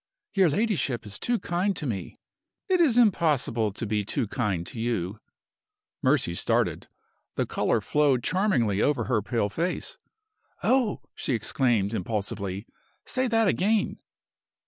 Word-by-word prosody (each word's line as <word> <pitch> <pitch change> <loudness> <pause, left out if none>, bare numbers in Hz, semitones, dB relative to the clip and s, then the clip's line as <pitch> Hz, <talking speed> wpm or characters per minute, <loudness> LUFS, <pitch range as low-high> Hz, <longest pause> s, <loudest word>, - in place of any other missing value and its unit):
"Your 190 -4 +4
ladyship 150 - 0
is 100 -1 -7
too 240 0 +1
kind 185 +1 -1
to 155 - -4
me." 105 -8 -4 0.5
"It 370 -3 +3
is 265 -8 +4
impossible 150 - +3
to 115 - -4
be 105 -1 0
too 115 +3 -1
kind 100 -6 -1
to 115 - -7
you." 110 -4 -2 0.8
Mercy - - +2
started. - - 0 0.5
The - - 0
color - - 0
flowed 145 -5 +2
charmingly 125 - +1
over 145 -1 +2
her 115 -5 +1
pale 115 -1 -1
face. 170 - -3 0.6
"Oh!" 250 -5 +2
she 130 - -1
exclaimed, 115 -2 +1
impulsively. 100 -1 -3 0.4
"Say 255 0 0
that 225 -2 +3
again!" 205 +3 +1
130 Hz, 135 wpm, -27 LUFS, -, 0.8 s, Your